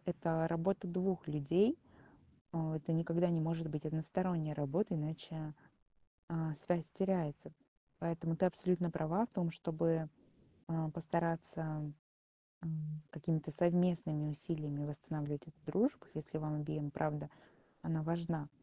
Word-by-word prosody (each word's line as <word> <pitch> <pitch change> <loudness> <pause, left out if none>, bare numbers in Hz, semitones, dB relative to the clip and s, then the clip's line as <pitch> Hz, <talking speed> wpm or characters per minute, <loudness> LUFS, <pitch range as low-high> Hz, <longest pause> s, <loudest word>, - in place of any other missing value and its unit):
это 165 -2 +1
работа 180 +4 +1
2 185 -1 +1
людей. 170 - +4 0.8
Э, 160 -1 0
это 155 +2 -1
никогда 165 +2 +3
не 170 -1 +3
может 165 0 0
быть 150 0 -3
односторонняя 160 +1 0
работа, 165 +8 +1
иначе, 155 0 -4 0.8
э, 160 -2 0
связь 170 -3 +1
теряется. 180 -7 0 0.5
Поэтому 165 0 0
ты 185 - +5
абсолютно 180 0 +2
права 170 +6 +2
в - - -16
том, 175 -5 +1
чтобы, 165 -1 +1 0.6
э, 160 -1 0
постараться, 160 -2 -1 0.7
м, 155 -2 -3
какими-то 160 -1 -1
совместными 175 -2 +3
усилиями 150 -1 -2
восстанавливать 145 -1 -3
эту 160 +1 -14
дружбу, 205 - +2
если 155 0 -4
вам 155 -1 -1
обеим, 150 -1 -2
правда, 150 +1 -1 0.5
она 160 -1 +1
важна. 165 -1 0
160 Hz, 120 wpm, -38 LUFS, 155-170 Hz, 0.8 s, ты